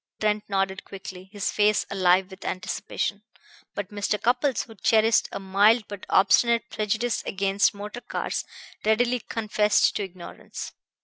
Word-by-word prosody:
Trent 210 -1 +1
nodded 195 -1 -1
quickly, 190 -1 -10
his 205 -2 -2
face 210 0 +2
alive 185 0 +3
with 190 +1 -11
anticipation; 200 +2 -3 0.5
but 205 -1 -4
Mr. 205 0 -1
Cupples, 250 +3 +1
who 225 - -13
cherished 220 +2 +3
a - - -4
mild 205 +4 +4
but 205 -2 -9
obstinate 235 +4 +3
prejudice 220 +2 -1
against 195 +2 +1
motor 210 +4 -7
cars, - - -3 0.4
readily 240 +3 +2
confessed 210 -2 +1
to 205 - -2
ignorance. 185 -2 -8
205 Hz, 135 wpm, -25 LUFS, 195-220 Hz, 0.5 s, mild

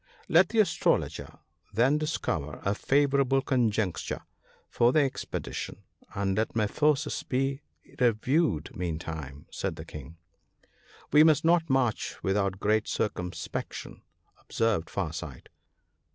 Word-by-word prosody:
" - - -27
Let 175 0 +6
the 230 - -3
Astrologer 210 -5 +1 0.3
then 125 +8 +3
discover 80 - -2
a 100 - +2
favourable 140 +2 +2
con 125 -5 +2
juncture 105 -4 -2 0.4
for 120 +1 +3
the 155 - +4
expedition, 135 -2 -4 0.3
and 95 -1 0
let 110 +2 -1
my 110 -2 +2
forces 150 +5 +1
be 135 +2 -1 0.4
re 125 -1 +6
viewed 125 - 0
meantime," 80 -4 -5
said 95 -4 -3
the 80 +1 -8
King. 75 +1 -10 0.9
"We 150 +1 +8
must 160 0 +4
not 165 -1 +3
march 130 -4 +1
without 95 -1 0
great 105 +1 +1
circumspection," 90 -4 -4 0.4
observed 110 -8 0
Far 85 -6 -3
sight. 80 -6 -8
110 Hz, 125 wpm, -28 LUFS, 90-140 Hz, 0.9 s, We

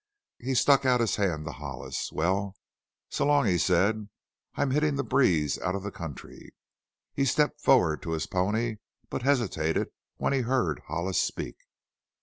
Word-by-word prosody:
He 130 +2 -2
stuck 140 +2 +5
out 125 -2 +3
a 115 -2 0
hand 80 -6 0
to 80 - -4
Hollis. - - -5
"Well, 95 +4 0 0.6
so - - 0
long," 145 -3 +4
he 90 -4 +2
said; 100 +5 +2 0.5
"I'm 135 - 0
hittin' 150 +1 +2
the 140 - -1
breeze 90 - +2
out 95 +1 -1
of 100 - -4
the 100 - -4
country." 80 -8 -9 0.6
He 140 - 0
stepped 150 +2 +1
forward 90 - +4
to 80 - -3
his 80 -3 -1
pony, 110 +5 0 0.3
but - - -2
hesitated 115 - +1 0.3
when - - 0
he 135 - +2
heard 120 - 0
Hollis 85 +3 0
speak. - - -4
105 Hz, 160 wpm, -28 LUFS, 85-130 Hz, 0.6 s, stuck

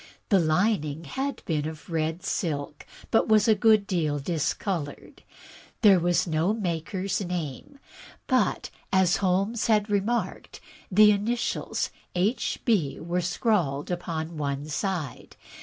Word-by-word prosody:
The 195 - +5
lining 160 -2 +1
had 270 - -4
been 155 -2 -1
of 155 -1 -8
red 165 +1 -2
silk, 150 -5 -3 0.2
but 225 - +3
was 215 -1 +4
a 220 - +6
good 215 0 +4
deal 160 -7 0
discolored. 160 +1 -3 0.6
There 200 -4 +7
was 175 0 +2
no 165 +5 +1
maker's 185 0 -2
name; 175 - -5 0.5
but, 255 -7 +1 0.2
as 190 -2 +3
Holmes 195 +4 0
had 210 -2 +2
remarked, 210 +4 -1 0.3
the 210 +2 +7
initials 220 +4 -1 0.2
"H. 200 +8 0
B." 170 - +1
were 175 +2 -1
scrawled 175 - 0
upon 165 -2 -4
one 140 -1 -2
side. 160 -2 -3
180 Hz, 125 wpm, -26 LUFS, 155-210 Hz, 0.6 s, There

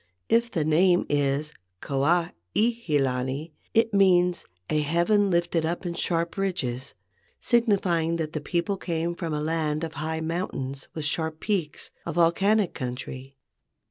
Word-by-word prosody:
If 235 +1 +3
the 160 -8 -1
name 175 +3 +4
is 145 +1 0 0.3
Kua 155 - +1 0.2
i - - +5
he 225 -9 +1
lani, 135 +3 -1 0.2
it 225 -1 +3
means 180 -3 +4 0.2
"a 155 - +1
heaven 170 +7 +2
lifted 170 -2 +1
up 170 +3 -2
in 175 - -2
sharp 170 0 -1
ridges," 135 -11 -2 0.4
signifying 190 -9 +2
that 160 -2 -3
the 155 - -3
people 170 +5 -1
came 170 -1 -2
from 170 -2 -4
a 150 - -1
land 155 0 -1
of 160 - -4
high 160 +2 -3
mountains 150 -5 -3
with 155 -2 -3
sharp 160 +1 -1
peaks, 180 -8 -2
a 170 - -4
volcanic 190 +4 +3
country. 130 +1 -6
165 Hz, 145 wpm, -26 LUFS, 150-180 Hz, 0.4 s, i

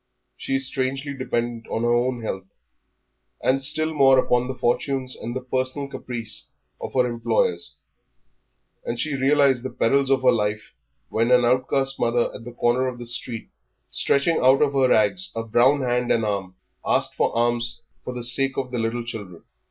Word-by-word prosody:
She 135 - -3
is 135 0 +2
strangely 135 +2 -2
dependent 120 -3 -3
on 115 - -2
her 120 0 +2
own 120 0 0
health, 95 -2 -6 0.8
and 135 +1 +1
still 155 +3 +2
more 135 -3 +5
upon 125 -1 +2
the 130 - -4
fortunes 130 +2 -1
and 120 +2 -6
the 130 - -3
personal 130 +2 -2
caprice 120 -5 -4 0.3
of - - -7
her 125 -1 +4
employers; 445 - -1 1.1
and - - -4
she 155 - -1
realised 135 -1 +3
the 130 - -5
perils 135 +3 +1
of 135 -1 +2
her 125 - +6
life 105 -2 -2 0.4
when 115 +2 0
an 125 -1 +5
outcast 135 +2 +1
mother 120 0 +1
at 115 - -10
the 120 - -7
corner 120 +2 +1
of 125 -1 -5
the 120 - -8
street, 120 -1 -2 0.4
stretching 150 +4 +2
out 130 +3 +5
of 140 -1 0
her 135 -2 +3
rags 125 - +2
a 115 - -2
brown 120 +5 +3
hand 125 0 0
and 115 -1 +2
arm, 95 -3 -3 0.3
asked - - +1
alms 120 0 +1 0.2
for - - -5
the 120 - -4
sake 135 +3 +3
of 130 -2 -3
the 125 - -2
little 115 +1 -2
children. 100 -7 -8
125 Hz, 175 wpm, -23 LUFS, 120-135 Hz, 1.1 s, her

